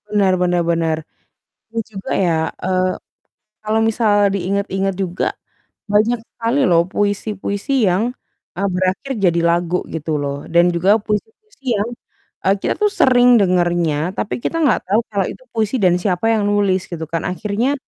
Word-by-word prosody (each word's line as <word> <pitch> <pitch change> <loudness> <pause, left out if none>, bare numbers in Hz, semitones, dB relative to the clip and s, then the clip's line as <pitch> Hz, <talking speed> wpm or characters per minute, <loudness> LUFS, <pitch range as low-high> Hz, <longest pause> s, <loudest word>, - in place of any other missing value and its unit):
Benar 200 -3 +2
benar 180 -1 +2
benar, 165 -1 +1 0.7
dan 230 0 -3
juga 200 -3 -8
ya, 175 -4 +2 0.3
eee, 185 0 +1 0.7
kalau 215 +1 +1
misalnya 215 -2 +3
diingat-ingat 195 0 -1
juga, 185 -2 -1 0.6
banyak 215 +4 +2
sekali 230 +3 -2
loh, 170 -1 +4
puisi-puisi 205 +3 -2 0.2
yang, 215 +7 0 0.4
e - - -2
berakhir 185 +8 -1
jadi 175 -4 +2
lagu, 170 +1 +1
gitu 160 -1 -3
loh, 140 0 -4
dan 170 +1 +4
juga 190 +6 +3
puisi-puisi 275 - -4
yang, 205 +3 -1 0.6
e - - +1
kita - - 0
tuh 420 -1 +2
sering 245 -4 +5
dengernya, 175 -3 +1
tapi 210 - -2
kita 330 - -1
nggak 285 -7 +3
tau 210 +4 +3
kalau 200 -3 0
itu - - -12
puisi 220 +1 -1
dan 180 -2 +4
siapa 185 +3 0
yang 215 -2 +1
nulis, 200 -3 +1
gitu 165 -2 -4
kan, 165 0 -2
akhirnya, 210 +8 -1
195 Hz, 150 wpm, -19 LUFS, 175-220 Hz, 0.7 s, sering